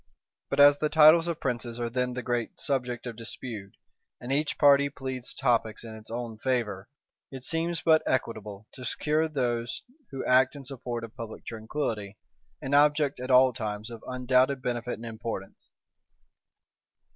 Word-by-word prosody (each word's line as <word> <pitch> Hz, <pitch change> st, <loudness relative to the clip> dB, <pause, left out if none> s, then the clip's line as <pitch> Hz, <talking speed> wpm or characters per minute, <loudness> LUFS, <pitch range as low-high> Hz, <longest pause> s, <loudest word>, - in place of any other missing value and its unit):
But 140 Hz, -, -1 dB
as 145 Hz, 0 st, +8 dB
the 155 Hz, -, +1 dB
titles 160 Hz, +2 st, +7 dB
of 170 Hz, -2 st, -2 dB
princes 120 Hz, -2 st, -3 dB
are 120 Hz, -, -1 dB
then 125 Hz, +1 st, -1 dB
the 125 Hz, 0 st, -4 dB
great 120 Hz, -2 st, -2 dB
subject 125 Hz, -3 st, -2 dB
of 120 Hz, -2 st, -5 dB
dispute, 110 Hz, -3 st, -7 dB, 0.4 s
and 120 Hz, -, -6 dB
each 145 Hz, +2 st, 0 dB
party 140 Hz, -1 st, +5 dB
pleads 130 Hz, -2 st, -6 dB
topics 115 Hz, -3 st, 0 dB
in 115 Hz, -1 st, -8 dB
its 110 Hz, 0 st, -13 dB
own 115 Hz, -1 st, -5 dB
favor, 115 Hz, -5 st, -1 dB, 0.4 s
it 130 Hz, -2 st, -9 dB
seems 165 Hz, +3 st, -1 dB
but 160 Hz, -1 st, +5 dB
equitable 110 Hz, -5 st, -2 dB
to 130 Hz, -, -10 dB
secure 155 Hz, +5 st, 0 dB
those 120 Hz, -5 st, -2 dB, 0.3 s
who 135 Hz, -, -5 dB
act 130 Hz, +2 st, +4 dB
in 140 Hz, -1 st, -9 dB
support 120 Hz, -3 st, -5 dB
of 115 Hz, -1 st, -9 dB
public 115 Hz, -1 st, -8 dB
tranquillity, 110 Hz, -3 st, -4 dB, 0.5 s
an 135 Hz, -, -3 dB
object 145 Hz, -1 st, +3 dB
at 125 Hz, -, -5 dB
all 130 Hz, 0 st, +6 dB
times 110 Hz, -2 st, -5 dB
of 115 Hz, -1 st, -9 dB
undoubted 130 Hz, +1 st, +2 dB
benefit 120 Hz, -1 st, -3 dB
and 115 Hz, -, -10 dB
importance. 110 Hz, -3 st, -7 dB
125 Hz, 160 wpm, -28 LUFS, 115-140 Hz, 0.5 s, as